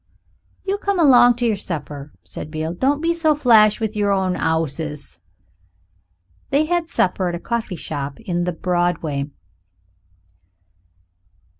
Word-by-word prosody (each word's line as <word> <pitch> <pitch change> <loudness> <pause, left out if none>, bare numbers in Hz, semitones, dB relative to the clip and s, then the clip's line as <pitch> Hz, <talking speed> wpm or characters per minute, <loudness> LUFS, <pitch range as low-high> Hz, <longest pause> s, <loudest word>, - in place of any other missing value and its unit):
"You 395 +1 -1
come 400 -1 -1
along 245 -6 +6
to 245 0 -2
yer 225 - +2
supper," 150 -7 -6
said 95 - -6
Beale; 155 +1 -3
"don't 275 +10 +1
be 335 +1 +2
so 320 -2 +2
flash 225 -7 +5
with 220 -1 -2
yer 205 -1 +1
own 190 -2 +1
'ouses." 150 - -2 1.3
They 290 +3 +2
had 345 0 -1
supper 185 0 +1
at 175 - -3
a - - -5
coffee 230 -2 -3
shop 145 -3 -5
in 175 -6 -2
the 180 - 0
Broadway. 170 -5 -1
190 Hz, 135 wpm, -21 LUFS, 160-245 Hz, 1.3 s, along